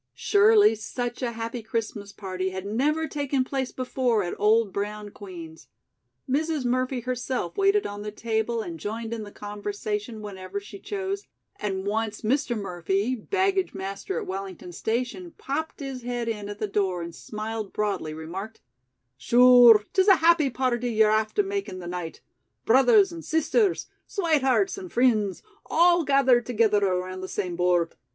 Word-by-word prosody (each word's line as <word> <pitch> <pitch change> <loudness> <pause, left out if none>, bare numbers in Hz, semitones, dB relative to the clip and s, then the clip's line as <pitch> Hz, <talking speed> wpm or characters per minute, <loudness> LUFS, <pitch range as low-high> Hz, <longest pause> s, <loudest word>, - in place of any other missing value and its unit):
Surely 420 - +5
such 240 +3 -5
a 240 -2 -2
happy 230 +1 -4
Christmas 220 -2 -4
party 185 -2 -4
had 190 0 -6
never 295 +10 0
taken 285 -3 -1
place 265 -1 -3
before 250 -4 0
at 175 - -3
old 215 -1 +3
brown 210 0 -4
Queen's. 170 -6 -10 0.6
Mrs. 300 +1 0
Murphy 255 +1 0
herself 250 -6 -3
waited 395 +1 +3
on 205 0 -5
the 210 - -4
table 225 +1 -1
and 165 -4 -7
joined 225 +4 -4
in 230 - -4
the 205 -1 -8
conversation 210 +2 -5
whenever 190 -1 -6
she 200 0 -11
chose, 395 - -4 0.3
and 195 -2 -3
once 215 +1 -2
Mr. 245 +1 0
Murphy, 195 +4 -1
baggage 380 - 0
master 195 - -4
at - - -6
Wellington 190 -2 -6
station, 245 - -3
popped 305 +3 -4
his 270 -2 -5
head 240 -1 -3
in 210 -3 -3
at 205 - -6
the 215 - -2
door 190 -4 -1
and 170 0 -7
smiling 215 +2 -5
broadly, 205 -7 -2
remarked: 180 +8 -7 0.6
"Shure, 240 - +7
'tis 380 +1 +3
a 390 - +8
happy 325 -3 +4
party 245 -1 -1
ye're 220 -2 +4
after 220 - +1
makin' 390 - -4
the 180 - -8
night; 175 -2 -6 0.4
brothers 270 - +5
and 335 -1 -8
sisters; 350 +6 +1 0.2
swatehearts 335 - +1
and 370 -2 -9
frinds 220 -6 +2 0.2
all 345 +1 +4
gathered 265 -4 +3
togither 215 -4 +2
around 185 0 -2
the 185 - -5
same 185 -3 -3
board. 175 -1 +1
225 Hz, 155 wpm, -26 LUFS, 200-270 Hz, 0.6 s, a